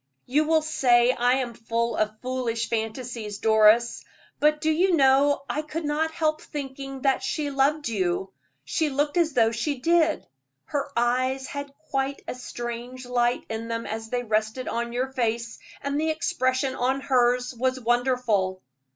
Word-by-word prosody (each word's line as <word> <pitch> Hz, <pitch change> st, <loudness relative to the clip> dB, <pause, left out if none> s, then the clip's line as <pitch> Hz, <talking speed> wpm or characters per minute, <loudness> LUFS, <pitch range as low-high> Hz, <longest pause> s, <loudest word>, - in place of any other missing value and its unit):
"You 295 Hz, +5 st, +2 dB
will 315 Hz, 0 st, +3 dB
say 245 Hz, -5 st, +4 dB
I 245 Hz, 0 st, +2 dB
am 255 Hz, -2 st, -1 dB
full 230 Hz, 0 st, -2 dB
of 215 Hz, 0 st, -1 dB
foolish 245 Hz, -3 st, -2 dB
fancies, 225 Hz, -1 st, -3 dB
Doris, 220 Hz, +2 st, +4 dB, 0.4 s
but 300 Hz, +1 st, +3 dB
do 315 Hz, +1 st, +1 dB
you 355 Hz, +3 st, +3 dB
know 275 Hz, 0 st, +4 dB
I 300 Hz, -, -1 dB
could 310 Hz, +1 st, -5 dB
not 300 Hz, +2 st, 0 dB
help 310 Hz, -1 st, -1 dB
thinking 270 Hz, -2 st, -7 dB
that 270 Hz, -1 st, +2 dB
she 285 Hz, +2 st, -2 dB
loved 280 Hz, +2 st, +1 dB
you; 190 Hz, -3 st, -1 dB, 0.3 s
she 305 Hz, -, 0 dB
looked 290 Hz, +3 st, 0 dB
as 325 Hz, -3 st, +2 dB
though 225 Hz, -3 st, +4 dB
she 275 Hz, +5 st, -2 dB
did. 320 Hz, +3 st, +2 dB, 0.4 s
Her 285 Hz, -2 st, -3 dB
eyes 255 Hz, +3 st, +1 dB
had 285 Hz, 0 st, -6 dB, 0.2 s
quite 270 Hz, 0 st, -1 dB
a -, -, -3 dB
strange 245 Hz, 0 st, -6 dB
light 245 Hz, 0 st, +1 dB
in 225 Hz, +1 st, -4 dB
them 230 Hz, 0 st, -3 dB
as 225 Hz, +1 st, -5 dB
they 245 Hz, 0 st, -1 dB
rested 220 Hz, +3 st, -1 dB
on 235 Hz, 0 st, -2 dB
your 255 Hz, +2 st, -2 dB
face, 235 Hz, -2 st, -2 dB, 0.2 s
and 280 Hz, +1 st, -1 dB
the 320 Hz, -, +1 dB
expression 260 Hz, -4 st, 0 dB
on 260 Hz, +2 st, 0 dB
hers 250 Hz, -1 st, +2 dB
was 255 Hz, +2 st, -1 dB
wonderful." 240 Hz, -6 st, +1 dB
255 Hz, 160 wpm, -25 LUFS, 235-285 Hz, 0.4 s, say